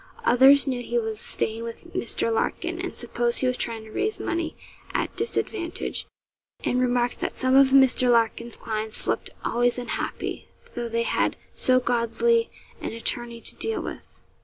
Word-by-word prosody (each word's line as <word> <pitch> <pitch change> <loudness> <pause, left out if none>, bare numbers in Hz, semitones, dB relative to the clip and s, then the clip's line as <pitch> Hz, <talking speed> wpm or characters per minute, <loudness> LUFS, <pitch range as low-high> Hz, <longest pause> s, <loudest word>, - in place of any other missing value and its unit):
Others 265 +3 +7
knew 255 -3 -1
he 240 0 -2
was 220 -2 -2
staying 225 0 0
with 230 0 -8
Mr. 230 -1 0
Larkin, 345 +9 -1
and 365 - -5
supposed 240 0 -1
he - - +1
was 250 0 +2
trying 230 -3 -3
to 220 - -13
raise 425 - -1
money 335 -1 -2 0.4
at - - -1
disadvantage, 360 -6 -2 0.6
and 250 - +1
remarked 245 -1 +1
that - - -3
some 260 0 +2
of 275 0 +8
Mr. 265 -2 +5
Larkin's 235 0 +2
clients 220 0 -4
looked - - -1 0.2
always 245 +1 +2
unhappy, 245 -1 -4 0.3
though 240 -1 -3
they 230 0 0
had - - +1 0.2
so 255 0 +3
godly 255 - +1 0.3
an - - -4
attorney 235 0 -2
to - - 0
deal 445 - +1
with. - - -9
245 Hz, 160 wpm, -25 LUFS, 230-270 Hz, 0.6 s, of